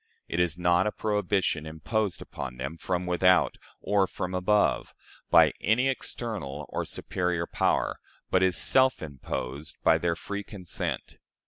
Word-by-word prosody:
It - - -2
is 85 -2 +1
not 90 +2 +3
a - - 0
prohibition 105 -7 0
imposed 85 +6 -2
upon 65 -2 -7
them 70 +5 -4
from 90 +1 -2
without, 90 +1 +3 0.2
or 100 -2 +2
from 90 0 -4
above, 100 +3 +1 0.3
by - - +6
any 125 +5 +3
external 95 - -4
or - - -2
superior 90 -2 -1
power, - - 0 0.3
but 95 - +4
is 95 -1 +3
self 130 -5 +3
imposed 70 +1 -5
by - - +5
their 85 -1 0
free 100 +3 -5
consent. 95 -4 -5
90 Hz, 140 wpm, -28 LUFS, 80-105 Hz, 0.3 s, by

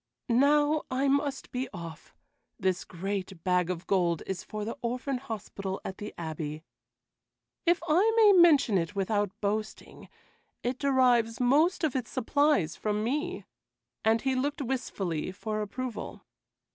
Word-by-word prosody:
"Now 290 +5 +4
I 265 +2 +1
must 280 0 0
be 255 +1 -3
off. 170 -4 -9 0.4
This 185 -2 0
great 190 -1 -5
bag 180 -1 +2
of 180 0 -4
gold 175 -4 +1
is 190 -1 -4
for 210 -1 -5
the 230 - -4
orphan 250 +2 -2
hospital 200 -5 -5
at 190 - -6
the 210 - -6
Abbey. 155 -2 -5 1.0
If 345 0 +3
I 365 +8 +4
may 440 -2 +7
mention 310 - +6
it 170 +4 -4
without 205 +1 -1
boasting, 215 +1 -4 0.5
it 245 +1 -2
derives 250 -5 +3
most 295 +9 +3
of 300 -5 +1
its 250 -4 -2
supplies 285 - +1
from 210 0 -1
me," 300 +10 -2 0.6
and 220 +1 +3
he 265 -1 +1
looked 285 +3 -1
wistfully 195 - -3
for 215 +3 -4
approval. 240 +3 -5
225 Hz, 140 wpm, -29 LUFS, 190-275 Hz, 1.0 s, may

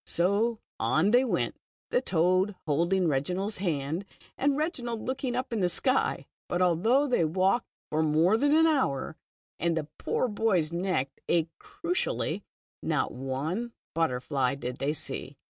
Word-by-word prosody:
So 205 +7 +1 0.2
on 155 - +3
they 245 +2 +6
went, 255 - -1 0.3
the - - +3
toad 185 +4 +2
holding 170 +5 +2
Reginald's 180 +9 -1
hand, 160 -1 -1 0.3
and 280 0 +1
Reginald 245 -8 -2
looking 260 -1 -2
up 255 -1 -2
into 205 -5 +1
the - - +2
sky. 260 +8 +1 0.2
But 175 - -1
although 190 - +3
they 250 -11 +2
walked 190 +8 +2 0.2
for 155 - +2
more 160 +6 +4
than 290 +6 +3
an 320 +1 +6
hour, 255 - +1 0.4
and 170 0 +1
the 155 -2 -2
poor - - 0
boy's 205 -8 +1
neck 170 -6 0 0.2
ached 165 -1 +2
cruelly, 360 +8 -2 0.4
//o/ - - 0
one 150 - -3 0.2
butterfly 135 -4 0
did 125 -2 -5
they 145 +2 0
see. 155 - -5
185 Hz, 145 wpm, -28 LUFS, 155-240 Hz, 0.4 s, they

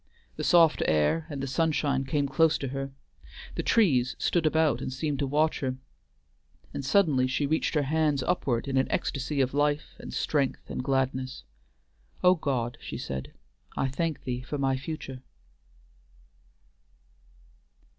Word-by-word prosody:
The - - -4
soft 170 -3 +5
air 80 - +2
and 140 -3 -5
the - - -2
sunshine 140 -1 +1
came 140 +1 0
close 160 +3 +3
to 135 - -4
her; 135 +1 -4 0.6
the - - -2
trees 135 - +3
stood 170 -3 +1
about 160 -1 +2
and - - -3
seemed 140 +1 -2
to 140 - 0
watch 155 +3 +1
her; 130 -2 -2 1.0
and 140 - -4
suddenly 135 -4 +3
she 135 +3 0
reached 155 +3 0
her 150 - +3
hands 150 -1 +1
upward 125 -6 0
in 135 -1 0
an 130 - +3
ecstasy 140 +1 -1
of 130 0 0
life 145 +1 0
and - - -8
strength 140 -4 -1
and - - -3
gladness. 130 0 -1 0.8
"O 180 0 +7
God," 125 -8 -2
she - - -6
said, 65 0 -5 0.5
"I 135 - +1
thank 160 +3 -2
thee 125 -1 -3
for 140 +3 -4
my 135 -1 +1
future." 135 -2 -6
140 Hz, 150 wpm, -28 LUFS, 130-155 Hz, 1.0 s, O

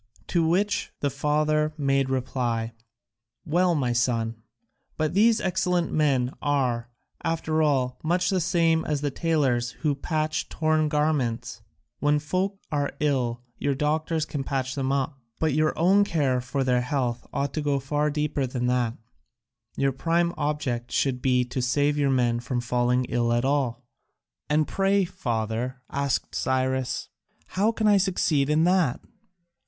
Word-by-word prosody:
To 170 -2 +2
which 205 +7 +1
the 145 - 0
father 150 +2 +1
made 135 -2 +1
reply, 120 -3 -1 0.7
"Well, 175 +2 +2
my 125 -5 0
son, 115 -2 0 0.6
but 155 0 0
these 220 +3 +4
excellent 180 -2 0
men 135 -5 +2
are, 125 -5 0 0.3
after 160 -1 0
all, 130 -4 +1
much 180 +3 +1
the 185 -2 +1
same 165 -2 +2
as 150 -2 -1
the 145 -1 -1
tailors 135 -6 +1
who 150 -2 +2
patch 155 +2 -2
torn 155 -1 +1
garments. 130 -7 -1 0.4
When 145 0 +3
folk 185 +6 -1
are 145 -1 -1
ill, 125 -5 0 0.2
your 140 -1 0
doctors 155 +2 0
can 145 -3 -4
patch 130 -1 -2
them 135 -1 -1
up, 135 0 -1 0.2
but 160 -3 +1
your 155 +1 +1
own 190 +5 +5
care 140 -9 +1
for 135 +2 -2
their 125 -1 +2
health 125 -2 -2
ought 140 0 -2
to 155 - -1
go 145 -2 +1
far 145 +3 0
deeper 150 -2 -1
than 125 -1 -3
that: 125 -2 0 0.8
your 135 0 +2
prime 170 +5 0
object 140 -5 -2
should 130 -3 0
be 125 -1 +2
to 125 +1 -3
save 145 +4 +1
your 145 -2 +1
men 120 -3 +2
from 120 +1 -2
falling 125 +1 +1
ill 120 -1 0
at 120 +1 +1
all." 135 -3 0 0.7
"And 150 0 +2
pray, 195 0 +2
father," 120 - -3
asked 140 -2 -1
Cyrus, 130 0 -1 0.4
"how 205 +4 +2
can 220 -1 -2
I 205 -1 +6
succeed 175 -7 +1
in 155 +1 +3
that?" 175 -7 +2
145 Hz, 150 wpm, -26 LUFS, 125-155 Hz, 0.8 s, I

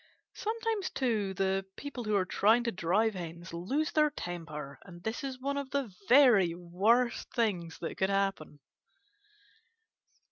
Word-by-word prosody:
Sometimes, 445 -2 -2
too, 215 -7 -1
the 195 0 +1
people 270 -4 -6
who 215 -1 +1
are 190 -2 +2
trying 220 +6 +3
to 235 - 0
drive 200 +5 +1
Hens 170 -2 -7
lose 265 - -1
their 305 -1 +4
temper, 160 - -6
and 175 -2 -13
this 225 +8 -3
is 265 -2 -5
one 280 +2 -2
of 280 -2 -4
the 270 -7 -2 0.2
very 235 -11 +6
worst 205 +8 +1
things 185 -9 0
that 165 - -4
could 190 - +1
happen. 195 -7 -1
205 Hz, 145 wpm, -31 LUFS, 175-260 Hz, 0.2 s, very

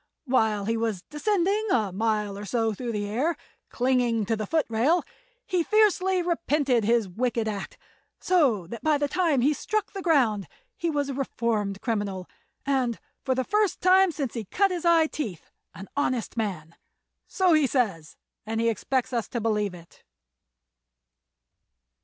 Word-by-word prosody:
While 220 -6 +1
he 225 +2 0
was 225 -5 -2
descending 405 +6 +1
a 215 - +1
mile 210 0 -1
or 200 - -7
so 225 +1 0
through 235 +3 -4
the 205 -2 -2
air, 260 +11 -1 0.3
clinging 245 -3 +1
to 225 - 0
the 215 -1 -4
footrail, 300 +1 +2 0.4
he 370 -6 +1
fiercely 380 -2 +3
repented 295 -8 +1
his 230 -1 +2
wicked 230 +3 -1
act, 205 -2 -5 0.4
so 270 - +2
that 225 +6 -8
by 310 -1 +2
the 290 0 0
time 320 -4 +1
he 290 +5 +3
struck 430 +7 -2
the 390 - -5
ground 245 - +2 0.3
he 340 - -2
was 290 -2 -1
a - - -2
reformed 225 -7 -2
criminal, 205 -5 -2 0.4
and, 260 -4 0 0.3
for 260 - 0
the 260 - 0
first 420 - +1
time 370 0 +5
since 280 -6 -4
he 230 -3 -4
cut 390 - +1
his 350 -2 -3
eye 335 -2 +5
teeth, 225 - -6 0.2
an 195 - -9
honest 255 -5 -1
man. 185 -8 -3 0.5
So 370 -3 +2
he 305 -3 +4
says, 195 - -1 0.3
and 225 +1 -3
he 230 0 +2
expects 255 +3 -1
us 235 -3 -1
to 240 - -3
believe 210 -4 0
it. 170 -1 -16
245 Hz, 160 wpm, -26 LUFS, 215-315 Hz, 0.5 s, time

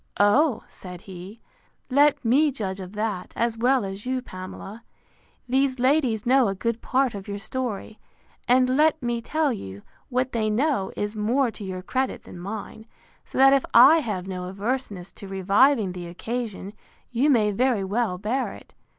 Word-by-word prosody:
O, 235 +6 +3
said 180 -2 -10
he, 190 +4 -10 0.5
let 285 0 +4
me 280 +7 +4
judge 195 -7 -4
of 185 0 -8
that, 210 -3 -3
as 235 -1 0
well 245 0 +2
as 195 +1 -6
you, 255 +1 -1
Pamela. 195 0 -9 0.7
These 265 +1 +1
ladies 255 -4 +2
know 255 -1 +4
a 195 - -2
good 230 +3 -2
part 265 -1 +1
of 200 -2 -8
your 200 0 -4
story; 220 -1 -5 0.5
and, 255 +1 +4
let 305 +2 +3
me 240 -1 -1
tell 305 +2 0
you, 100 - -8 0.3
what 255 +1 0
they 220 -2 0
know 240 -2 0
is 205 +1 -2
more 235 +4 +1
to 215 - -10
your 185 -1 -5
credit 260 +6 -2
than 175 - -11
mine; 215 +3 -7 0.4
so - - -9
that 270 +1 +7
if 275 - +3
I 270 +8 +9
have 200 - -4
no 180 -1 -5
averseness 200 -2 -4
to 200 - -11
reviving 195 +4 +3
the 180 -1 -7
occasion, 210 +2 -5 0.4
you 255 +5 +2
may 215 -6 +3
very 240 -1 +1
well 200 -1 -1
bear 230 +8 -2
it. - - -15
225 Hz, 170 wpm, -25 LUFS, 195-260 Hz, 0.7 s, I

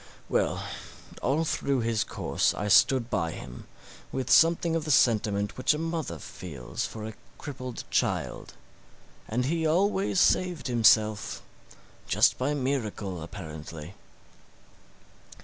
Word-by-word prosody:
Well, - - 0 0.6
although 145 +6 +1
through 140 -4 0
his 115 -1 +1
course - - 0
I 105 +1 -2
stood 125 +3 +4
by 85 -3 0
him, 65 0 -9 0.4
with 130 -1 -2
something 165 0 +5
of 165 - -1
the 155 - -6
sentiment 105 -6 +2
which 130 - +3
a - - -3
mother 165 - -3
feels 70 -4 -6
for 110 -1 -7
a 110 - -6 0.2
crippled 130 -4 -6
child; - - -1 0.7
and 125 +3 -1
he 165 +4 0
always 190 +4 +2
saved 175 -8 +2
himself 110 -3 +3 0.6
just - - +3
by 140 +4 0
miracle, 110 - -2
apparently. 80 +1 -8
125 Hz, 120 wpm, -28 LUFS, 100-155 Hz, 0.7 s, something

